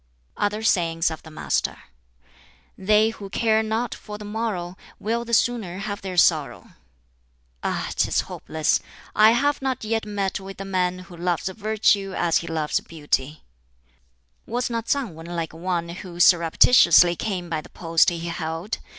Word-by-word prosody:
Other 210 +2 -1
sayings 165 -5 +2
of 160 - -7
the 160 - -13
Master: 155 - -1 1.0
"They 210 +3 +3
who 200 -3 -9
care 220 +1 +2
not 220 +2 -2
for 210 0 -9
the 210 - -9
morrow 205 -5 -3 0.2
will 230 +3 -2
the 235 - -8
sooner 215 -6 0
have 200 +1 -5
their 185 -2 -6
sorrow. 150 -8 +2 0.9
"Ah, - - -2
'tis - - +2
hopeless! 155 -1 -1 0.4
I 215 +1 +7
have 285 +4 +1
not 265 -3 -2
yet 220 0 -1
met 200 -1 -2
with 195 0 -9
the 195 - -6
man 185 -1 0
who 175 - -12
loves 175 0 -1
Virtue 205 -1 +1
as 170 -2 +2
he 170 - -4
loves 155 -2 0
Beauty. 150 -2 -3 1.0
"Was 245 +2 -2
not 230 -1 -3
Tsang 270 -10 0
Wan 165 +1 -11
like 170 -2 -4
one 170 0 -2
who 175 0 -8
surreptitiously 175 +1 +6
came 185 -2 -3
by 160 -2 -2
the - - -15
post 165 -1 +2
he 175 - -4
held? 170 +3 -4
185 Hz, 160 wpm, -23 LUFS, 170-220 Hz, 1.0 s, I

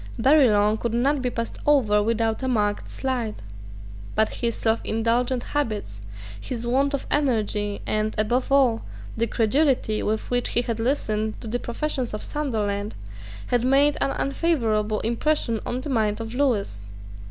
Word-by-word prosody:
Barillon 220 -7 +4
could 235 0 -2
not 275 +4 +2
be 250 - 0
passed 230 -1 -4
over 235 -8 +3
without 225 +1 0
a 260 - -2
marked 210 -4 0
slight. 245 -5 -2 0.8
But 220 0 +3
his 235 -2 -1
selfindulgent 230 +2 0
habits, 215 - -3 0.4
his 240 -2 -4
want 275 +4 +2
of 280 - -5
energy, 215 -7 0
and, 215 0 -1
above 240 +5 0
all, 255 -5 +4 0.3
the 230 +1 0
credulity 240 -1 +1
with 220 +3 -2
which 245 0 +1
he 240 - +2
had 230 -2 -3
listened 220 -4 -1
to - - -7
the 240 +3 -1
professions 255 -2 -2
of 210 - -6
Sunderland, 215 -8 -2 0.5
had 245 -1 +2
made 275 +3 +4
an 275 - +2
unfavourable 225 -9 0
impression 235 0 0
on 250 +1 -2
the 290 - -6
mind 215 -5 +1
of 225 0 -6
Lewis. 210 - -1
230 Hz, 150 wpm, -24 LUFS, 215-265 Hz, 0.8 s, Barillon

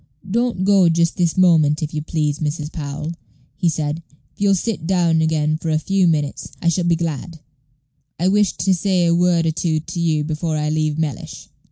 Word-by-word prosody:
"Don't 230 -1 0
go 195 -3 +5
just 170 0 +1
this 175 -2 +1
moment, 160 -5 +4
if 155 - -4
you 150 - -2
please, 150 -1 -2
Mrs. 150 0 -3
Powell," 150 +1 -5 0.4
he 175 - +1
said. 155 0 -2 0.3
"If - - -18
you'll 200 -1 +4
sit 185 -4 -3
down 170 -3 +2
again 155 -1 +1
for 165 - -3
a 155 - +2
few 190 +3 +1
minutes, 150 -4 -1
I 170 - +1
shall 175 +1 0
be 170 -1 +3
glad. 165 0 -4 0.8
I 180 - +1
wished 205 0 +2
to 190 - +3
say 185 -1 +1
a 170 - +3
word 175 -1 +2
or 160 - +2
two 160 0 -1
to 165 +3 -6
you 160 -3 +1
before 155 +1 -2
I 150 0 -1
leave 155 -1 0
Mellish." 150 -7 -4
165 Hz, 200 wpm, -20 LUFS, 155-180 Hz, 0.8 s, go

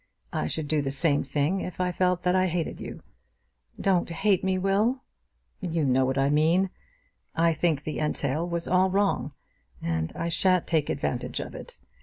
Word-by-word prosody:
I 75 - -1
should 155 - -3
do 155 0 +1
the 135 - -2
same 145 +1 +2
thing 145 +7 0
if 180 -1 -6
I 180 0 +1
felt 180 0 +1
that 180 0 +2
I 185 0 +3
hated 170 -2 -2
you." - - -7 0.8
"Don't 185 -3 +2
hate 195 +3 +1
me, 190 0 +1
Will!" 205 +7 +1 0.6
"You 165 -3 -1
know 130 0 +3
what 130 +1 -1
I 135 +1 +3
mean. 165 +5 +3 0.6
I 165 0 +3
think 155 -2 0
the 155 - -4
entail 150 +2 -1
was 170 -1 -2
all 185 +1 +3
wrong, 195 -9 +1 0.5
and 80 -1 -2
I 170 - -2
shan't 180 +1 +2
take 155 -4 +1
advantage 130 -3 -2
of - - -6
it. - - -9
170 Hz, 180 wpm, -27 LUFS, 145-185 Hz, 0.8 s, I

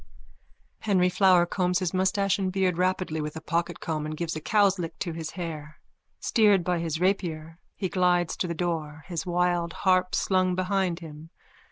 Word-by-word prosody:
_ - - -9
_(Henry 180 -2 +3
Flower 180 -2 +5
combs 180 0 0
his 180 -2 -2
moustache 190 +1 +1
and 190 -1 -1
beard 185 -2 +1
rapidly 185 -3 0
with 150 0 -5
a - - -4
pocketcomb 160 -1 -2
and 155 0 -5
gives 170 -1 -3
a 155 - -5
cow's 200 +1 +3
lick 165 -2 -5
to 175 - -3
his 160 -1 -5
hair. 155 -3 -6 0.4
Steered 205 -6 +3
by 180 0 0
his 160 -1 -2
rapier, 170 -4 -1 0.2
he 190 - -2
glides 180 -2 +1
to 180 - -1
the 170 - -3
door, 160 -3 -3
his 170 0 -4
wild 175 -1 0
harp 185 -1 +3
slung 185 -1 +1
behind 185 -1 0
him. 155 0 -10
175 Hz, 180 wpm, -26 LUFS, 165-185 Hz, 0.4 s, Flower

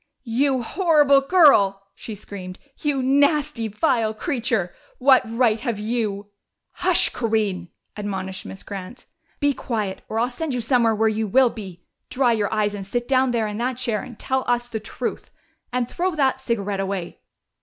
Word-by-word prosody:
"You 260 +2 +1
horrible 295 - +4
girl!" 275 - +5
she 220 - -8
screamed. 190 -2 -8 0.2
"You 285 -3 0
nasty, 285 -2 +2
vile 220 -1 0
creature! 225 - -1 0.2
What 265 0 +6
right 230 -2 +2
have 235 -5 -2
you 210 -2 -2 0.2
" - - -55
"Hush, - - +4
Corinne!" 215 -6 -1 0.3
admonished 190 -2 -4
Miss 190 - -9
Grant. 200 +5 -8 0.3
"Be 285 -1 +2
quiet, 215 -7 -3
or 220 - -3
I'll 235 +2 +2
send 285 +1 -3
you 245 - -1
somewhere 230 -2 +2
where 220 +1 +2
you 220 0 0
will 255 +4 +4
be! 190 -5 -9 0.3
Dry 250 -2 +2
your 210 -2 -1
eyes 210 -1 +1
and 200 -1 -5
sit 240 +5 -3
down 265 -1 +3
there 235 -2 0
in 210 0 -4
that 250 +1 -1
chair 235 -4 -1
and 250 -4 -10
tell 265 -1 -1
us 240 0 +1
the 225 -2 -4
truth. 215 - -5 0.4
And 250 -1 0
throw 360 +5 -2
that 265 -3 +1
cigarette 205 -6 -2
away!" 195 -3 -4
230 Hz, 170 wpm, -23 LUFS, 205-260 Hz, 0.4 s, What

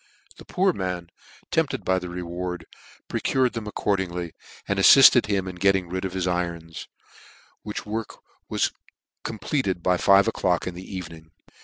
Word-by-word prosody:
The - - -13
poor 190 0 +1
man, 90 - -4 0.4
tempted - - 0
by 95 0 +2
the 90 -1 -7
reward, 90 0 -5 0.4
procured 130 -2 0
them 115 -3 -5
accordingly, 90 -5 -2 0.3
and 100 0 0
afiifted 125 +3 +8
him 100 -3 0
in 90 -1 -7
getting 95 -1 +2
rid 95 +2 -3
of 95 - -4
his 95 -1 -1
irons, 85 -2 -3 0.7
which 105 0 -6
work 110 +1 -4 0.3
was - - +1 0.5
compleated 105 - -2
by 90 -1 +3
five 100 +3 +5
o'clock 90 -6 0
in 90 - -4
the 90 +2 -10
evening. 80 -3 -8
95 Hz, 150 wpm, -24 LUFS, 90-100 Hz, 0.7 s, afiifted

